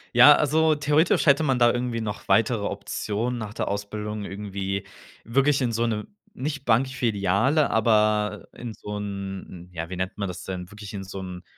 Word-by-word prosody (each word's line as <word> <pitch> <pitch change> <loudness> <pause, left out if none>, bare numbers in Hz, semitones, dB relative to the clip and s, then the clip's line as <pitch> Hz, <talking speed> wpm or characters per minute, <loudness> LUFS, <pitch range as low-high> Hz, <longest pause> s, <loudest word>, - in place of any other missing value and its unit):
Ja, 125 +5 +10
also 155 +1 +3
theoretisch 150 +3 +2
hätte 140 0 +5
man 135 -4 +2
da 120 -1 +5
irgendwie 120 -2 -2
noch 105 -2 -5
weitere 105 +2 +2
Optionen 110 +4 -3
nach 105 -1 -6
der - - -2
Ausbildung 105 +1 -4
irgendwie 100 -1 -4 0.4
wirklich 135 +4 +2
in 120 -2 +1
so 115 +1 0
'ne 105 -2 -2 0.3
nicht 140 -2 -4
Bankfiliale, 120 - +2
aber 105 -1 +2
in 120 -2 -7
so 105 0 -6
'n, 95 -3 -6
ja, 85 -1 -5
wie 95 - -5
nennt 95 +2 -3
man 100 - -2
das 90 - -7
denn? 90 -1 -6
Wirklich 105 0 -10
in 95 -1 -5
so 95 +1 -7
'n 90 -1 -7
105 Hz, 175 wpm, -25 LUFS, 100-125 Hz, 0.4 s, Ja